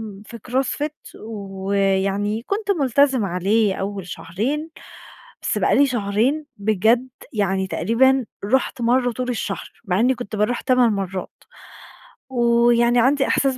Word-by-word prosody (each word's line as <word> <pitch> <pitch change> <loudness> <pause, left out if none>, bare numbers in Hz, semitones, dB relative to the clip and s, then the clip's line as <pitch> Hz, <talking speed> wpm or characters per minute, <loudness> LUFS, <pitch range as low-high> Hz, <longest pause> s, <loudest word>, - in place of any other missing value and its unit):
آمم 205 -3 -8
في 235 - -9
CrossFit 285 +4 -3
ويعني 195 0 -1
كُنت 405 - -3
ملتزمة 270 - +2
عليه 195 +3 +1
أوّل 195 -1 -4
شهرين، 255 - -3 0.7
بس - - 0
بقى - - +2
لي 285 - +5
شهرين 245 +5 0
بجد 220 +5 +2 0.2
يعني 195 -4 0
تقريبًا 240 +8 +2 0.2
رُحت 255 +2 0
مرّة 245 +1 +2
طول 250 +2 -4
الشهر 240 - -4
مع 190 -1 0
إنّي 255 +3 +3
كُنت 245 -3 -6
باروح 210 +4 0
8 250 -3 +3
مرّات. 190 -2 -3 1.0
ويعني 235 -1 +3
عندي 270 +3 +3
إحساس 270 -2 +1
230 Hz, 130 wpm, -21 LUFS, 200-260 Hz, 1.0 s, لي